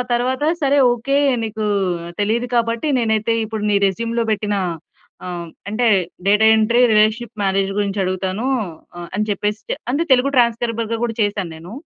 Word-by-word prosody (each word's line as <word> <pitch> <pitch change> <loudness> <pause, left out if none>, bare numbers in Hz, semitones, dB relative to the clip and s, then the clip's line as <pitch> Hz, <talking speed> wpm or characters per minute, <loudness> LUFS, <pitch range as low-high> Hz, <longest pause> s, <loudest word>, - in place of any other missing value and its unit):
తరువాత 255 +4 0 0.2
"సరే 280 +1 +3
ఒకే, 275 +4 0 0.3
నీకు 215 0 -4 0.6
తెలీదు 230 +4 0
కాబట్టి 230 +3 0
నేనైతే 220 -1 +1
ఇప్పుడు 220 -1 -5
నీ 200 - +3
రెజ్యూమ్‌లో 230 +4 -1
పెట్టిన 210 -1 -1 0.7
ఆహ్, 175 -2 -5 0.2
అంటే 230 +3 0 0.4
డేటా 210 +2 +4
ఎంట్రీ, 235 +3 +3
రీ‌లేషన్‌షిప్ 215 +2 +2
మేనేజర్ 195 0 0
గురించి 200 0 -1
అడుగుతాను" 185 +5 -2 0.7
అని 210 +1 0
చెప్పేసి 210 +2 -2 0.3
అంటే 305 +4 +1
తెలుగు 260 +2 +4
ట్రాన్స్‌స్క్రయిబర్‌గా 230 -1 +1
కూడా 230 -2 -2
చేశాను 205 -4 -2
నేను. 170 +6 -11
220 Hz, 135 wpm, -19 LUFS, 205-235 Hz, 0.7 s, డేటా